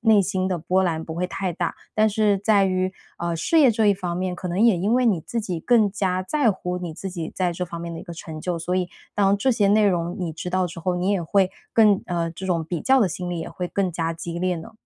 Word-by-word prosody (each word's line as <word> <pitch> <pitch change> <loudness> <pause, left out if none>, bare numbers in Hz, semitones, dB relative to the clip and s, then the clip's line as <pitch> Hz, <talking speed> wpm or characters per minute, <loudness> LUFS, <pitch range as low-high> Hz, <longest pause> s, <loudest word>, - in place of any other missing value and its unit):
内 220 -3 +5
心 185 -1 -1
的 180 - 0
波 180 +4 +1
澜 160 -3 -1
不 160 - -6
会 180 +2 -1
太 185 0 -3
大？ 175 -1 -2 0.2
但 215 0 +4
是 210 -1 +2
在 205 0 +3
于， 185 0 0 0.3
呃， 170 -1 -2
事 325 - +2
业 270 - +7
这 220 -1 +2
一 205 - +6
方 180 -2 -4
面， 185 0 -2
可 180 0 -5
能 175 - -2
也 230 -4 +5
因 205 +6 +1
为 250 0 +3
你 200 -8 +2
自 230 +8 -3
己 175 -5 -3
更 225 -2 +3
加 185 -2 0
在 270 +4 +2
乎 180 -2 -3
你 175 -3 -6
自 190 +3 -6
己 170 -3 -5
在 180 -2 0
这 180 +2 -3
方 170 0 -7
面 170 0 -5
的 165 - -6
一 - - -9
个 170 - -8
成 160 -1 -8
就， 175 +1 -2
所 175 +2 -2
以 185 -1 0 0.3
当 200 -1 +3
这 260 +6 +1
些 205 -3 +2
内 210 0 +4
容 175 -2 0
你 175 -3 -3
知 160 +3 -6
道 185 0 +1
之 170 0 -8
后 180 +1 0
你 180 +3 0
也 190 -4 +1
会 190 +2 +2 0.2
更 210 -3 +5
呃， 170 -2 -1
这 185 +3 -7
种 170 -3 0
比 165 0 -3
较 265 0 +4
的 210 - +3
心 180 +1 -5
理 175 - -3
也 - - -5
会 180 -1 -4
更 190 -3 -1
加 165 0 -1
激 170 +1 -5
烈 180 0 0
呢？ 160 - -9
185 Hz, 305 characters per minute, -23 LUFS, 170-200 Hz, 0.3 s, 业